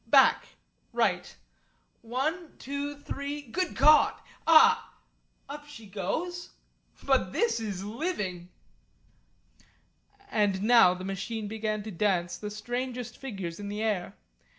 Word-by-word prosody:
"Back - - +5 0.5
right. - - 0 0.7
One 305 +9 -3
two 280 +2 -4
three 285 +1 -5
good 350 +9 -2
God! 305 0 +6 0.3
Ah! 320 -1 +6 0.5
Up 290 +1 -8
she 240 -7 -11
goes! 315 - -3 0.5
But - - +2
this 470 - +1
is 200 -4 -4
living!" 205 - -3 1.8
And 200 -2 +1
now 225 -5 +6
the 185 +1 -7
machine 205 +3 -4
began 215 0 -2
to 215 - -6
dance 175 -2 0
the 210 - -5
strangest 245 +2 -4
figures 195 -10 -6
in 200 0 -5
the 210 +2 -3
air. 205 -5 -1
220 Hz, 115 wpm, -28 LUFS, 200-285 Hz, 1.8 s, God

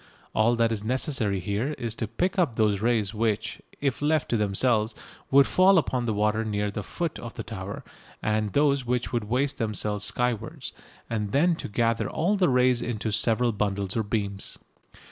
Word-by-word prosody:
All 115 +2 +3
that 115 -1 +2
is 105 -2 -2
necessary 115 -4 0
here 105 - -2
is 115 -2 -3
to 115 -1 -3
pick 180 - -1
up 150 -11 +2
those 105 -3 +2
rays 115 -3 +1
which, 110 0 -1 0.2
if 140 -2 -1
left 150 0 +1
to - - +1
themselves, 105 +2 +1 0.3
would 140 +1 +6
fall 190 +1 +5
upon 125 -6 0
the 110 - +1
water 105 +1 +1
near 105 -1 -1
the 105 - -4
foot 170 - -4
of 120 -1 -8
the - - -5
tower, 100 -3 -6 0.4
and 105 -2 -1
those 140 -2 +3
which 125 0 -2
would 120 -3 0
waste 130 +6 0
themselves 105 -2 -1
skywards, 125 +2 -1 0.3
and 105 -3 -3
then 165 +5 +4
to - - -5
gather 115 +2 0
all 175 +6 +1
the 185 -3 +3
rays 125 -1 +3
into 110 -2 -2
several 115 +3 +2
bundles 100 -2 -2
or 115 - +2
beams. 100 -2 -3
115 Hz, 185 wpm, -26 LUFS, 105-130 Hz, 0.4 s, would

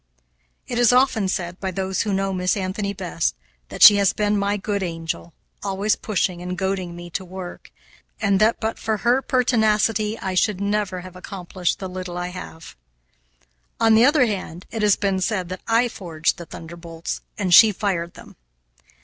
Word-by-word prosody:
It 240 - -2
is 245 -1 +5
often 250 -5 +3
said, 180 -1 -3
by 190 - -2
those 190 +1 -2
who 210 - -1
know 195 0 0
Miss 185 +1 0
Anthony 200 +1 -2
best, 180 -3 -2 0.3
that - - +1
she 205 -2 +11
has 200 -1 +3
been 210 0 +1
my 200 0 0
good 200 0 -2
angel, 165 -1 -4 0.3
always 200 +2 0
pushing 185 -4 -1
and 180 +1 -5
goading 190 -2 -2
me 175 0 -9
to 190 - -3
work, 185 0 -9 0.5
and 200 -3 +2
that 220 +2 +3
but 220 0 -3
for 220 -1 -1
her 245 +3 +4
pertinacity 220 -4 +1
I 190 -3 -4
should 190 +1 +1
never 200 -2 -1
have 185 0 -11
accomplished 180 -1 -3
the 190 - -5
little 180 -1 -6
I 180 0 -3
have. 165 - -10 1.0
On 225 -1 +5
the 225 +2 +6
other 285 -2 +5
hand 185 -5 -5
it 225 - -3
has 210 -1 +4
been 195 -2 -1
said 185 -3 -1
that 185 - -6
I 230 +2 +3
forged 170 -7 -2
the 170 - -8
thunderbolts 165 0 -7 0.2
and 185 -3 0
she 220 +5 +9
fired 180 -4 -2
them. - - -14
195 Hz, 180 wpm, -22 LUFS, 180-215 Hz, 1.0 s, she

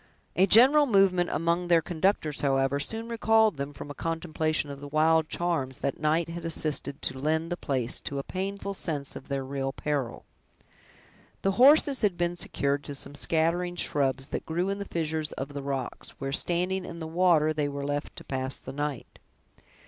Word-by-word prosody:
A 190 - +4
general 270 +8 +7
movement 195 -5 +4
among 170 +3 0
their 170 -1 +5
conductors, 170 -3 0
however, 135 0 +2
soon 225 +10 -4
recalled 220 -4 +3
them 140 +1 -4
from 145 +1 -8
a - - -5
contemplation 160 -1 -1
of 140 0 -9
the 145 - -7
wild 155 +2 +3
charms 160 -7 -1
that 140 - -3
night 155 +2 +1
had 170 0 -6
assisted 155 -4 -2
to 130 - -3
lend 160 +4 0
the - - +1
place 130 -7 -1
to 140 - -5
a 140 - -2
painful 200 +3 -4
sense 150 -7 -3
of - - -9
their 135 -1 -2
real 135 0 -2
peril. 140 -4 -3 1.2
The 195 - +3
horses 275 +4 +5
had 200 -5 +1
been 175 0 0
secured 140 -4 -1
to 145 - -5
some 140 +1 -7
scattering 170 +4 0
shrubs 135 -4 0
that - - -3
grew 175 +4 0
in 200 +1 -2
the 200 - -4
fissures 160 -3 -2
of 135 +2 -5
the 140 - -4
rocks, 135 -2 -5
where, 135 0 -3
standing 180 +5 0
in 170 - -8
the 160 - -5
water, 160 -2 +3
they 150 -2 -1
were 140 0 -4
left 145 +1 -3
to - - -9
pass 130 0 -3
the 130 - -9
night. 145 -2 -4
160 Hz, 185 wpm, -28 LUFS, 140-180 Hz, 1.2 s, general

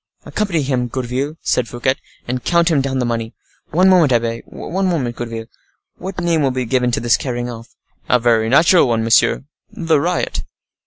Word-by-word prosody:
"Accompany 190 -8 -1
him, 130 -2 -1
Gourville," 130 +4 -3
said 125 - +1
Fouquet, 120 +3 0 0.3
"and 125 0 -3
count 170 0 +2
him 145 -4 +3
down 135 -1 -2
the 125 - 0
money. 115 -1 -3 0.3
One 180 +4 +3
moment, 175 -7 +5
abbe—one 120 +10 -2
moment, 135 -10 -1
Gourville—what 120 +10 -9
name 170 -2 +1
will 140 - +2
be 130 -1 -2
given 125 +1 +1
to 120 - 0
this 120 0 +3
carrying 120 -2 -3
off?" 115 -1 -11 0.3
"A 125 - +5
very 115 -2 +2
natural 165 +5 +5
one, 115 -2 0
monsieur—the 150 +7 +1
Riot." 175 +2 -1
130 Hz, 165 wpm, -18 LUFS, 120-165 Hz, 0.3 s, moment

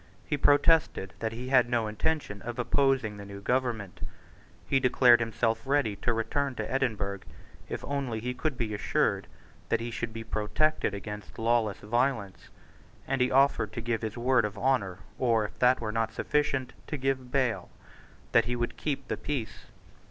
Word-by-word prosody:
He 150 - 0
protested 145 - +3
that 110 -1 -2
he 120 +3 -6
had 130 -3 +5
no 120 -2 +1
intention 105 -1 -2
of 120 +2 -6
opposing 125 -3 +1
the 100 - -8
new 100 0 -8
government. 115 -4 -1 0.7
He 135 - +2
declared 125 -2 +6
himself 115 0 0
ready 135 -6 +1
to 120 - 0
return 130 +4 -1
to - - -4
Edinburgh, 110 -7 -1 0.5
if - - -4
only 135 -5 -2
he 125 +3 -3
could 130 +2 -2
be 110 -4 -2
assured 105 - 0 0.4
that - - +2
he 120 +1 -4
should 115 0 -3
be 115 0 -6
protected 110 +3 0
against 105 0 -8
lawless 115 -3 +1
violence; 115 -3 -1 0.6
and 135 -1 0
he 125 - +3
offered 135 -5 +3
to - - -4
give 115 -1 -1
his 110 0 -4
word 125 0 +3
of 105 0 -3
honour, 105 -7 +1 0.2
or, 115 -4 +3
if - - -9
that 125 +1 +5
were 110 -2 -3
not 115 0 -1
sufficient, 140 0 0
to 150 - -3
give 130 -1 -1
bail, 130 -4 0 0.6
that - - +5
he 120 +1 -1
would 120 0 -2
keep 140 -3 -3
the - - -2
peace. 125 -8 -4
120 Hz, 175 wpm, -29 LUFS, 110-135 Hz, 0.7 s, declared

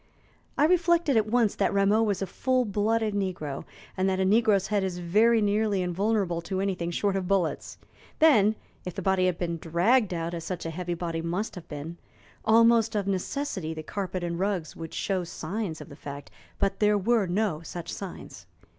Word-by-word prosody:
I 295 - +5
reflected 340 -3 +3
at 220 -1 +3
once 230 -2 +2
that - - +1
Rameau 200 +2 +3
was 205 -3 0
a - - 0
full 255 +7 0
blooded 215 +1 0
negro, 180 -8 -3 0.3
and 190 0 +1
that 190 0 0
a 190 - +2
negro's 205 -1 +3
head 205 -2 +1
is 185 -2 -2
very 215 +6 +3
nearly 205 -2 +1
invulnerable 185 -1 0
to 185 +2 -3
anything 185 -3 -1
short 195 +3 0
of 190 -2 -2
bullets. 185 -4 -1 0.4
Then, 220 -10 +5 0.3
if 180 - -6
the 195 - -4
body 190 -1 +2
had 180 -2 0
been 170 -1 -2
dragged 190 +8 +2
out 170 -1 -3
as 165 -1 -4
such 175 0 -5
a 165 - -3
heavy 175 +1 -3
body 165 -1 -3
must 175 +6 -2
have 180 - -10
been 150 +3 -6 0.5
almost 230 0 +4
of 205 -2 0
necessity 190 - -2
the 155 - -6
carpet 185 0 -4
and 170 0 -3
rugs 190 -5 -2
would 165 -1 -8
show 190 -2 -1
signs 175 0 -4
of 150 - -10
the 140 - -10
fact, 140 0 -9 0.3
but 195 0 0
there 210 0 +4
were 215 0 +2
no 180 -3 0
such 170 +1 -7
signs. 195 -3 -8
195 Hz, 190 wpm, -27 LUFS, 175-215 Hz, 0.5 s, I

